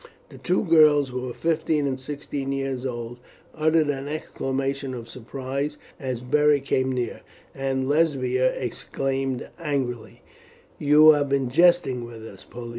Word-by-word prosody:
The -, -, -13 dB
two 185 Hz, +4 st, +1 dB
girls, 155 Hz, -5 st, +5 dB
who 125 Hz, 0 st, -4 dB
were 125 Hz, -1 st, -4 dB
fifteen 160 Hz, -2 st, 0 dB
and 135 Hz, -1 st, -2 dB
sixteen 140 Hz, 0 st, -5 dB
years 135 Hz, -1 st, -2 dB
old, 120 Hz, -1 st, -6 dB, 0.3 s
uttered 155 Hz, -1 st, +2 dB
an 135 Hz, -1 st, -2 dB
exclamation 135 Hz, -2 st, -3 dB
of 115 Hz, -1 st, -8 dB
surprise 135 Hz, +5 st, -5 dB, 0.2 s
as 130 Hz, -3 st, -4 dB
Beric 145 Hz, +1 st, +3 dB
came 130 Hz, -1 st, +1 dB
near, 125 Hz, -3 st, -3 dB, 0.3 s
and 135 Hz, -1 st, -2 dB
Lesbia 130 Hz, -4 st, +2 dB
exclaimed 135 Hz, +1 st, -3 dB
angrily: 135 Hz, -8 st, -3 dB, 0.6 s
"You 150 Hz, +2 st, +7 dB
have 145 Hz, -2 st, +1 dB
been 135 Hz, -3 st, 0 dB
jesting 170 Hz, -5 st, +3 dB
with 115 Hz, -2 st, -9 dB
us, 95 Hz, -3 st, -12 dB
Pollio. 120 Hz, -1 st, -9 dB
135 Hz, 140 wpm, -24 LUFS, 130-150 Hz, 0.6 s, You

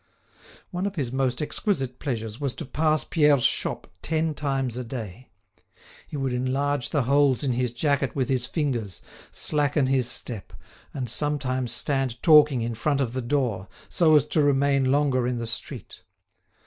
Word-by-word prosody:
One 180 Hz, +2 st, -2 dB
of 200 Hz, -, -6 dB
his 135 Hz, -7 st, -2 dB
most 130 Hz, 0 st, 0 dB
exquisite 135 Hz, -, -2 dB
pleasures 115 Hz, -5 st, -4 dB
was 140 Hz, -3 st, -2 dB
to 160 Hz, -, -5 dB
pass 155 Hz, +3 st, +1 dB
Pierre's 150 Hz, -5 st, +3 dB
shop -, -, +1 dB, 0.2 s
ten 160 Hz, 0 st, 0 dB
times 135 Hz, -5 st, -2 dB
a 125 Hz, -, -4 dB
day. 115 Hz, -1 st, -8 dB, 0.8 s
He 150 Hz, -, -6 dB
would 135 Hz, -2 st, -1 dB
enlarge 130 Hz, +2 st, -1 dB
the 145 Hz, -4 st, +1 dB
holes 140 Hz, +1 st, +3 dB
in 135 Hz, -, +1 dB
his 125 Hz, 0 st, -1 dB
jacket 140 Hz, +2 st, 0 dB
with 130 Hz, -3 st, 0 dB
his 130 Hz, -2 st, 0 dB
fingers, 120 Hz, -, -3 dB, 0.3 s
slacken 145 Hz, -1 st, +1 dB
his 130 Hz, -2 st, +1 dB
step, 115 Hz, -6 st, -4 dB, 0.4 s
and 130 Hz, -3 st, -4 dB
sometimes 130 Hz, -1 st, 0 dB
stand 130 Hz, -1 st, 0 dB
talking 150 Hz, -6 st, +6 dB
in 115 Hz, 0 st, -2 dB
front 140 Hz, +5 st, 0 dB
of 125 Hz, -4 st, -1 dB
the 130 Hz, -, -2 dB
door, 120 Hz, -7 st, -1 dB, 0.2 s
so 160 Hz, -3 st, +4 dB
as 150 Hz, -, +5 dB
to 155 Hz, -, +3 dB
remain 140 Hz, -1 st, +2 dB
longer 135 Hz, -3 st, +2 dB
in 125 Hz, -1 st, -1 dB
the 115 Hz, -, -3 dB
street. 115 Hz, -1 st, -6 dB
135 Hz, 165 wpm, -25 LUFS, 125-145 Hz, 0.8 s, talking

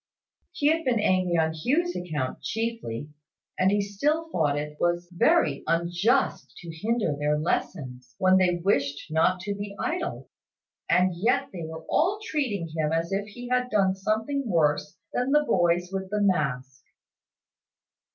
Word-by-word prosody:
He 330 Hz, -3 st, -4 dB
had 325 Hz, +1 st, +1 dB
been 245 Hz, -5 st, +1 dB
angry 185 Hz, -4 st, +2 dB
on 160 Hz, 0 st, +2 dB
Hugh's 300 Hz, -, 0 dB
account 150 Hz, -7 st, -3 dB
chiefly; 225 Hz, -, -3 dB, 0.5 s
and 185 Hz, -, +4 dB
he 205 Hz, +1 st, +2 dB
still 295 Hz, +12 st, -1 dB
thought 145 Hz, -4 st, +1 dB
it 150 Hz, 0 st, -5 dB
was 175 Hz, 0 st, 0 dB
very 150 Hz, -4 st, +3 dB
unjust 175 Hz, +10 st, +1 dB
to 165 Hz, -2 st, -9 dB
hinder 215 Hz, -3 st, 0 dB
their 150 Hz, +1 st, 0 dB
lessons, 130 Hz, -5 st, -3 dB
when 185 Hz, 0 st, +4 dB
they 180 Hz, -2 st, +3 dB
wished 145 Hz, -5 st, 0 dB
not 180 Hz, +3 st, +2 dB
to 200 Hz, +2 st, -3 dB
be 200 Hz, 0 st, -6 dB
idle: 350 Hz, +1 st, -3 dB, 0.6 s
and 180 Hz, 0 st, +3 dB
yet 240 Hz, +9 st, +1 dB
they 170 Hz, -3 st, -5 dB
were 160 Hz, 0 st, -8 dB
all 380 Hz, +6 st, +2 dB
treating 260 Hz, -, -2 dB
him 155 Hz, -1 st, 0 dB
as 165 Hz, +2 st, -1 dB
if 200 Hz, +1 st, -1 dB
he 245 Hz, +3 st, -9 dB
had 250 Hz, 0 st, +1 dB
done 195 Hz, -4 st, +3 dB
something 220 Hz, +8 st, -1 dB
worse 150 Hz, -2 st, +1 dB, 0.2 s
than 250 Hz, +2 st, 0 dB
the 300 Hz, 0 st, +5 dB
boys 175 Hz, -6 st, +1 dB
with 190 Hz, -1 st, -4 dB
the 210 Hz, +1 st, -1 dB
mask. 140 Hz, -9 st, 0 dB
185 Hz, 155 wpm, -26 LUFS, 160-230 Hz, 0.6 s, the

